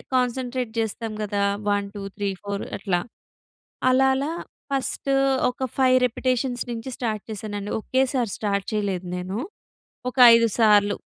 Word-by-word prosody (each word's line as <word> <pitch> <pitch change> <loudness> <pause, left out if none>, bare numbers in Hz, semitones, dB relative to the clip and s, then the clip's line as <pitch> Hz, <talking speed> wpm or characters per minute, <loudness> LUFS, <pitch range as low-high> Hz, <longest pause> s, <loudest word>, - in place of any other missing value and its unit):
Concentrate 250 -1 -1
చేస్తాం 225 0 -2
కదా! 205 -1 -1 0.3
One 205 0 +1
two, 200 - -5
three, 200 -1 -1
four 200 0 -3
అట్లా 185 -3 0 0.9
అలా 265 +1 +4
అలా 280 +4 -1 0.4
ఫస్ట్ 275 0 -2 0.4
ఒక 250 - -5
ఫైవ్ 255 -1 +5
రిపిటీషన్స్ 250 0 -1
నుంచి 230 +2 -5
స్టార్ట్ 215 -4 -2
చేశానండి. 205 -1 -5
ఒకేసారి 260 -4 0
స్టార్ట్ 200 -2 -1
చేయలేదు 195 -4 -1
నేను. 185 +3 -4 0.7
ఒక 255 - -13 0.2
ఐదు 230 0 +5
సార్లు. 205 -2 +5
225 Hz, 130 wpm, -24 LUFS, 205-255 Hz, 0.9 s, ఫైవ్